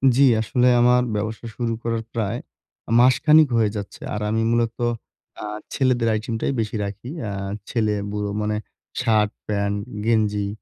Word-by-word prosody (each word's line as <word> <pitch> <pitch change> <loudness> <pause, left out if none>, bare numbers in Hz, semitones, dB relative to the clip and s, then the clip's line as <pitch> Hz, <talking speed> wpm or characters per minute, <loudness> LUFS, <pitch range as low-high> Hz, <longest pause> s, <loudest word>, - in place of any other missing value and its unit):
জি, 135 - +3 0.2
আসলে 125 +3 +2
আমার 125 +1 +5
ব্যবসা 110 +3 -3
শুরু 120 -2 -1
করার 115 -1 -1
প্রায় 115 0 -1 0.5
আ - - -3
মাসখানেক 150 +5 +6
হয়ে 110 -2 +3
যাচ্ছে। 100 -1 -6
আর 105 - -3
আমি 110 +1 +1
মূলত 115 -1 +1 0.7
আ - - -6 0.3
ছেলেদের 125 -3 +2
আইটেমটাই 115 +3 -2
বেশি 110 0 -2
রাখি। 100 +5 -7 0.2
আ - - -4 0.4
ছেলে, 110 -3 +1 0.2
বুড়ো 105 0 -2
মানে 105 0 -1 0.5
শার্ট, 105 -2 +2 0.2
প্যান্ট, 100 -1 0 0.3
গেঞ্জি, 105 -3 +1
110 Hz, 145 wpm, -23 LUFS, 105-120 Hz, 0.7 s, মাসখানেক